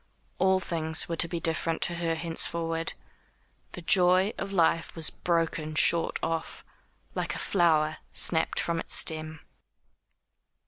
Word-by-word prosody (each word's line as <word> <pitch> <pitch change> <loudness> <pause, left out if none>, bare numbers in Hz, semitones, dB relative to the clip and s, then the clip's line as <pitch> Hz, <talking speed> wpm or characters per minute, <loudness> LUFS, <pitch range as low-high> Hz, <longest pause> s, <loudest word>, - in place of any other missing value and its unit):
All 190 0 +3
things 160 -3 +1
were 170 - -3
to 170 - +2
be 170 0 -4
different 165 0 -1
to 175 - +1
her 165 -1 -1
henceforward. 165 0 -1 0.8
The 180 - -8
joy 185 +3 +4
of 195 - -4
life 165 -3 +1
was 165 -2 +1
broken 165 -2 -2
short 170 +1 +2
off, 165 0 -4 0.5
like - - -3
a - - -5
flower 155 -4 +1
snapped 160 -1 +1
from 170 -1 -1
its - - -3
stem. 155 -1 0
165 Hz, 135 wpm, -28 LUFS, 160-175 Hz, 0.8 s, joy